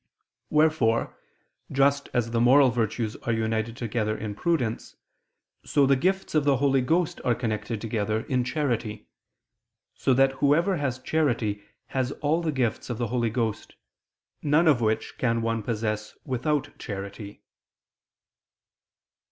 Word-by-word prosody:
Wherefore, 150 -7 +2 0.6
just 140 +1 +2
as 115 -2 0
the 115 0 +1
moral 130 +2 +6
virtues 115 -1 -1
are 115 - -3
united 110 0 -1
together 110 -2 -1
in 105 -1 -4
prudence, 120 -2 -1 0.7
so 145 -2 +3
the 135 0 +4
gifts 190 +8 0
of 155 -2 +3
the 140 -2 +3
Holy 135 0 +2
Ghost 165 +6 0
are 120 - +2
connected 110 -2 -3
together 110 -1 -1
in 125 0 0
charity: 120 -5 -2 0.8
so 130 - +1
that 135 +1 +4
whoever 165 +7 +3
has 135 -4 -1
charity 120 -8 0 0.3
has 130 +1 -1
all 155 +3 0
the 165 -2 -1
gifts 125 -5 -1
of 120 - -3
the 120 -2 -2
Holy 120 -2 0
Ghost, 110 -2 -3 0.7
none 150 +3 +3
of 140 -6 +4
which 110 -1 -1
can 115 -2 +1
one 115 0 0
possess 105 -1 -3
without 145 +3 -1
charity. 100 0 -7
120 Hz, 135 wpm, -26 LUFS, 110-140 Hz, 0.8 s, moral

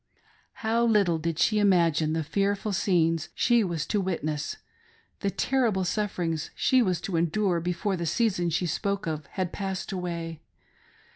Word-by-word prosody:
How 230 +2 +2
little 200 -8 +3
did 165 0 -2
she 215 +4 +3
imagine 170 -6 +3
the 160 0 0
fearful 200 +5 -1
scenes 165 -4 +1
she 240 -2 +3
was 170 -5 -2
to 210 - 0
witness 155 - -2 0.3
— 455 0 -35
the 200 - +1
terrible 230 -4 +1
sufferings 180 -5 -2
she 260 -1 +3
was 185 -7 +1
to 175 -2 -2
endure 175 +2 +1
before 180 +4 -1
the 170 -2 -3
season 185 -4 +1
she 170 +2 0
spoke 200 +4 -1
of 155 -3 -4
had 185 -3 -3
passed 190 -1 -4
away. 170 -3 -4
180 Hz, 155 wpm, -27 LUFS, 165-205 Hz, 0.3 s, little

